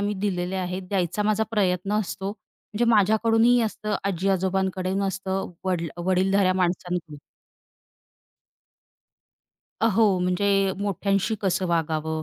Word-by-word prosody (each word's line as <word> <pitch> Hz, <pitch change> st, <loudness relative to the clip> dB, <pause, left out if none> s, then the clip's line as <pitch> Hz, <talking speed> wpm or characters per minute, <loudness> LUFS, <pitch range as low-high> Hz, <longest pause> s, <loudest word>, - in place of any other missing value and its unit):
मी 205 Hz, +1 st, -1 dB
दिलेले 180 Hz, -1 st, -1 dB
आहेत. 185 Hz, 0 st, -3 dB
द्यायचा 190 Hz, +1 st, -1 dB
माझा 215 Hz, +1 st, +1 dB
प्रयत्न 195 Hz, -2 st, 0 dB
असतो, 195 Hz, 0 st, -4 dB
म्हणजे 215 Hz, +1 st, -6 dB
माझ्याकडून 220 Hz, +2 st, +3 dB
ही 245 Hz, 0 st, +5 dB
असतं, 215 Hz, -1 st, -2 dB
आजी-आजोबांकडंन 190 Hz, 0 st, 0 dB
असतं 195 Hz, -1 st, -2 dB
वड्ल 175 Hz, -3 st, -1 dB, 0.2 s
वडीलधाऱ्या 190 Hz, +1 st, +3 dB
माणसांकी. 175 Hz, -4 st, -2 dB, 2.6 s
अ, 225 Hz, -, +3 dB
हो, 205 Hz, -3 st, +3 dB
म्हणजे 180 Hz, +3 st, +1 dB, 0.3 s
मोठ्यांशी 200 Hz, +1 st, 0 dB
कसं 190 Hz, -1 st, 0 dB
वागावं, 160 Hz, -1 st, -1 dB
190 Hz, 110 wpm, -24 LUFS, 180-205 Hz, 2.6 s, ही